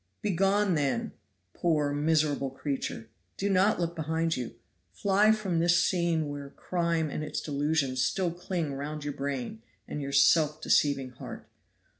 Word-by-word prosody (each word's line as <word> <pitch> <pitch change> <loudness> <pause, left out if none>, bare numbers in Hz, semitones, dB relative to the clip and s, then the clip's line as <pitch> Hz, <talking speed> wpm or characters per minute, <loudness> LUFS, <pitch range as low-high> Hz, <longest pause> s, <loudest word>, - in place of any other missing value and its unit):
"Begone, 195 0 +2
then, 160 - 0 0.4
poor 150 -4 +1
miserable 145 -2 +1
creature! 135 -4 -4 0.3
Do 200 +1 0
not 195 +2 +3
look 170 -1 -1
behind 160 +1 0
you. 125 -2 -5 0.4
Fly 205 +2 +3
from 200 -6 0
this 175 +1 +4
scene 170 -4 +1
where 145 -1 -6
crime 170 -2 -1
and 155 - -3
its - - -3
delusions 145 -3 0
still 180 +3 +1
cling 175 -3 -3
round 145 +2 -5
your 145 0 -3
brain 140 - -4 0.3
and 150 - -4
your 140 0 -4
self 150 +2 +4
deceiving 140 -4 +2
heart. 125 - -9
160 Hz, 145 wpm, -29 LUFS, 145-175 Hz, 0.4 s, this